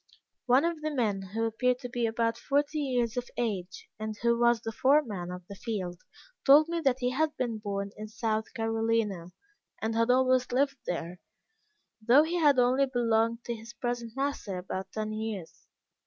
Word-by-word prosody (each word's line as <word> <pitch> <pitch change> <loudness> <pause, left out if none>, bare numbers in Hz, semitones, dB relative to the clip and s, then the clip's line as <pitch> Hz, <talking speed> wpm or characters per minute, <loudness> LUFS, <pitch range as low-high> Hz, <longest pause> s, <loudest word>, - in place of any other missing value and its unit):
One 255 +5 +5
of 335 -2 -2
the 310 - -1
men 220 -9 0
who 225 - 0
appeared 250 +3 +1
to 250 - -4
be 240 -1 -1
about 230 0 0
forty 290 +5 0
years 250 -5 0
of 245 - -3
age, 195 -6 -3
and 215 -1 -4
who 235 0 +4
was 240 -1 +4
the 225 - -5
foreman 230 -8 +2
of 180 -1 -8
the - - -8
field, 190 -5 -4 0.4
told 295 +3 +7
me 340 0 -1
that 265 -5 +1
he 250 0 +1
had 305 +4 0
been 235 -3 -2
born 200 -1 -3
in 215 0 -7
South 220 0 -2
Carolina, 225 -5 0 0.5
and 220 +1 -1
had 230 +1 +1
always 255 0 +3
lived 275 +2 +1
there, 175 0 -4 0.8
though 245 +7 +6
he 335 +3 -1
had 290 -4 +5
only 255 +2 +4
belonged 230 -2 +1
to 240 - -3
his 230 +1 -10
present 240 -2 -4
master 270 -8 -2
about 190 +1 -5
ten 215 0 -3
years. 215 -6 -6
230 Hz, 180 wpm, -29 LUFS, 215-255 Hz, 0.8 s, told